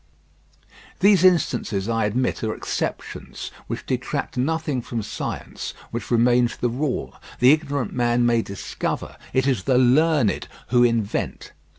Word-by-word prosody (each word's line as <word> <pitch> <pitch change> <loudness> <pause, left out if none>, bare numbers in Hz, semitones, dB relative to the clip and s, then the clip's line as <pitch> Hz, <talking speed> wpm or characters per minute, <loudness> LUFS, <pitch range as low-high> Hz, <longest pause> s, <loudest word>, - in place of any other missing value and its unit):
These 200 -1 +5
instances 125 - +2
I 115 -2 +1
admit 120 +5 -1
are 110 -1 -1
exceptions, - - -4 0.2
which - - -5
detract - - -3
nothing 150 0 -1
from 115 -1 -4
science, - - -5 0.2
which 120 - -5
remains 120 0 +3
the 120 - 0
rule. 130 +3 -2 0.3
The 125 +2 +7
ignorant 145 -5 0
man 120 0 +2
may 120 -1 +3
discover; 100 -2 -4 0.2
it 130 0 +2
is 130 -9 0
the 130 - +3
learned 130 -1 +3 0.2
who 120 0 +4
invent. 115 -4 -1
125 Hz, 130 wpm, -23 LUFS, 115-140 Hz, 0.3 s, The